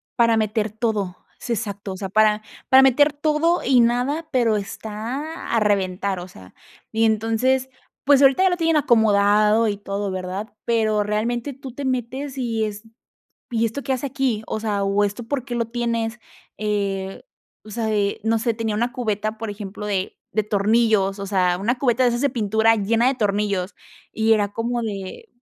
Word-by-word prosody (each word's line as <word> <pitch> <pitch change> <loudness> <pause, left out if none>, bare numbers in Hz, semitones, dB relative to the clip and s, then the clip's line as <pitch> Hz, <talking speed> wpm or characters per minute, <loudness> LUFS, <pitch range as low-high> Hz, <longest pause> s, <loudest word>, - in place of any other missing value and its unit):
para 230 -2 +4
meter 215 0 0
todo. 210 -4 -2 0.2
Es - - -8
exacto. 205 -4 -3
O - - -8
sea, 190 0 -5
para, 215 +1 +3 0.3
para 265 0 +8
meter 290 +3 +4
todo 310 +3 +1
y 255 -1 +4
nada, 250 +7 +1
pero 235 -5 +2
está 225 - -5
a 230 - +4
reventar, 195 -2 0
o 175 - -7
sea, 95 - -15 0.4
y 225 0 +2
entonces, 225 +4 +1 0.3
pues, 280 0 +5
ahorita 275 +7 +5
ya 380 - +5
lo 355 - -1
tienen 330 -1 +2
acomodado 215 -3 +4
y 205 -1 -1
todo, 200 0 -4
¿verdad? 185 +4 -5
Pero 215 -3 +2
realmente 235 +6 -2
tú 270 -1 -9
te 280 +2 -5
metes 260 +2 -3
y 230 -3 -1
es, 210 0 -6 0.7
¿y 230 -1 +1
esto 225 +6 -5
qué 270 - -1
hace 260 +2 -2
aquí? 260 -5 -1
O - - -3
sea, 210 -2 -1
¿o 200 +1 +2
esto 205 +4 -3
por 260 +1 -3
qué 250 -2 -5
lo 235 -1 0
tienes? 230 0 -2 0.4
Eh, 200 -2 -2 0.4
o 215 - -12
sea, 220 0 -2
eh, 205 -1 0
no 225 0 +2
sé, 230 +1 0
tenía 220 -1 -2
una 240 +3 -1
cubeta, 215 -4 -2
por 225 -1 -4
ejemplo, 205 0 -7
de 195 -2 -2 0.2
de 215 - +1
tornillos. 210 -1 +2
O 200 - -4
sea, 180 -3 +1
una 240 +5 0
cubeta 245 -1 +2
de 250 - +5
esas 240 0 -1
de 285 - +3
pintura 220 -1 +2
llena 225 +3 +1
de 270 - +3
tornillos 200 -4 -1 0.4
y 225 0 +2
era 205 -2 +1
como 235 +2 -2
de, 205 - -6
220 Hz, 185 wpm, -22 LUFS, 205-245 Hz, 0.7 s, para